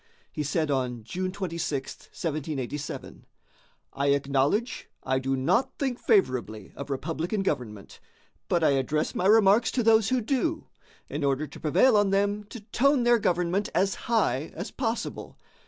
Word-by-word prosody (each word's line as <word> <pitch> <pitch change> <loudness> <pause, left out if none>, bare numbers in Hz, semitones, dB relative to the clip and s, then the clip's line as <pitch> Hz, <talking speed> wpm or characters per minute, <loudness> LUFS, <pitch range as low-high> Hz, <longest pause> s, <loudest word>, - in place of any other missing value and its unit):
He - - -4
said 150 +1 0
on 125 -4 -1
June 185 +11 -3
26, 170 -7 -4
1787: 150 -3 -5 0.7
"I 140 +1 -1
acknowledge 140 - +1
I 130 0 0
do 135 +1 -1
not 185 - +1
think 260 -3 -2
favorably 120 - 0
of 140 - -7
republican 165 +8 -2
government; 120 - -4 0.5
but 170 -2 +1
I 150 - +5
address 140 +3 0
my 185 - 0
remarks 215 +1 +5
to 245 - +1
those 220 -2 +4
who 255 0 +2
do, 280 +7 -1 0.4
in 150 - -4
order 140 +2 +1
to - - -12
prevail 215 - +4
on 205 -1 +3
them 205 +1 0
to 230 +2 -10
tone 265 +5 +2
their 240 0 +4
government 180 +1 0
as 190 +3 +2 0.2
high 160 - +1
as 175 +5 -5
possible. 235 -3 -4
170 Hz, 150 wpm, -27 LUFS, 140-215 Hz, 0.7 s, I